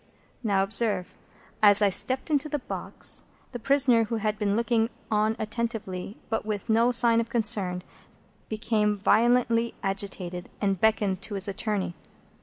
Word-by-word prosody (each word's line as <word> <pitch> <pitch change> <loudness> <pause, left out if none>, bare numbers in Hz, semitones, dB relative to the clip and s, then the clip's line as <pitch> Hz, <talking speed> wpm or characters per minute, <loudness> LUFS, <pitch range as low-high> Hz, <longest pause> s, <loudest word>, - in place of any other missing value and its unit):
Now, 200 -3 +2
observe. 205 -2 +2 0.5
As 205 -1 +7
I 205 - +4
stepped 260 +9 +1
into 295 +1 +1
the 295 - -1
box, 265 - -2 0.3
the 245 - -6
prisoner, 255 -3 +3
who 230 - -3
had 215 -1 -2
been 205 -1 0
looking 230 0 +1 0.2
on 215 +1 +1
attentively, 215 -3 -4
but 225 - -2
with 210 -1 -5
no 230 +2 +3
sign 235 -1 +4
of 230 - -6
concern, 210 -6 0 0.7
became 215 -1 0
violently 235 +2 +2
agitated, 195 -2 -4
and 195 -3 -1
beckoned 210 -4 +1
to 205 - -5
his 195 +1 0
attorney. 200 -2 -3
215 Hz, 145 wpm, -26 LUFS, 200-235 Hz, 0.7 s, As